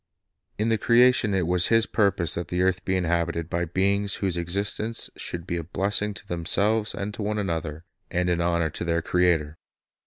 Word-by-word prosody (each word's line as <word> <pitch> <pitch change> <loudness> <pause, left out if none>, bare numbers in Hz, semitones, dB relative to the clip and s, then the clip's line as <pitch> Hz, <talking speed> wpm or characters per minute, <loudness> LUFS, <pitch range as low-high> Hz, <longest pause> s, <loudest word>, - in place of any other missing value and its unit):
"" - - -50
In 110 +2 0
the 110 -1 +1
creation 120 -3 +4
it 90 -3 +1
was 90 +1 +2
His 115 -1 +3
purpose 100 -6 +1
that 85 - -3
the 90 +1 -1
earth 95 -1 0
be 95 - -1
inhabited 85 -2 -1
by 85 0 0
beings 100 +4 0
whose 95 -3 -1
existence 100 +6 -2
should 85 -1 -5
be 85 -2 -3
a 85 - -4
blessing 100 +4 0
to 105 - -9
themselves 100 +5 +1
and 105 +1 -4
to 105 - -6
one 105 +1 -2
another, 80 -5 -3 0.3
and 90 0 -1
an 85 -1 +1
honor 85 -2 0
to - - -5
their 85 -1 -1
Creator. 85 -4 +1
90 Hz, 195 wpm, -25 LUFS, 85-105 Hz, 0.3 s, creation